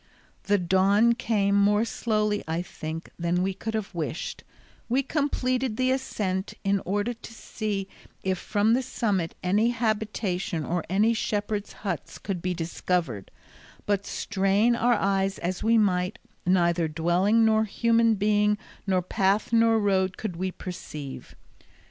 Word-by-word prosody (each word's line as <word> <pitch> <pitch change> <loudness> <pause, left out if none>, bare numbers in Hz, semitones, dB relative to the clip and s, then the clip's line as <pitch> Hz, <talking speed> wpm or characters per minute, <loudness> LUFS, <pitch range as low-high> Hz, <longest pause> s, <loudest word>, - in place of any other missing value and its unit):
The 205 0 +3
dawn 195 +5 +4
came, 215 -4 +1
more 205 +2 +4
slowly, 215 -2 0
I 165 +2 -1
think, 160 -1 -7
than 175 +1 +1
we 195 +1 0
could 220 +4 -4
have 215 -3 -3
wished; 160 0 -4 0.5
we 260 +3 +2
completed 255 -5 0
the 255 0 +2
ascent 200 -7 -2
in 195 -1 +1
order 205 +5 0
to 230 0 -12
see 210 -3 -3 0.4
if 190 -1 0
from 210 +2 +2
the 255 - +3
summit 200 -9 -1
any 205 +6 +3
habitation 210 -7 -1
or 175 0 -1
any 210 +5 +3
shepherds' 210 -2 -2
huts 175 -5 -3
could 190 -4 -4
be 180 0 -1
discovered, 165 - -2 0.6
but 200 -1 0
strain 200 +4 +1
our 240 +1 +3
eyes 195 -1 +1
as 180 +1 -3
we 230 +1 +4
might, 185 0 +1 0.3
neither 170 -2 +3
dwelling, 175 +8 +2
nor 220 0 +3
human 230 +1 +3
being, 210 +1 +2 0.3
nor 185 -2 +2
path 195 +5 +1
nor 230 0 +5
road 190 -3 +1
could 210 -6 -4
we 185 +2 -2
perceive. 150 -7 -8
200 Hz, 140 wpm, -26 LUFS, 185-220 Hz, 0.6 s, nor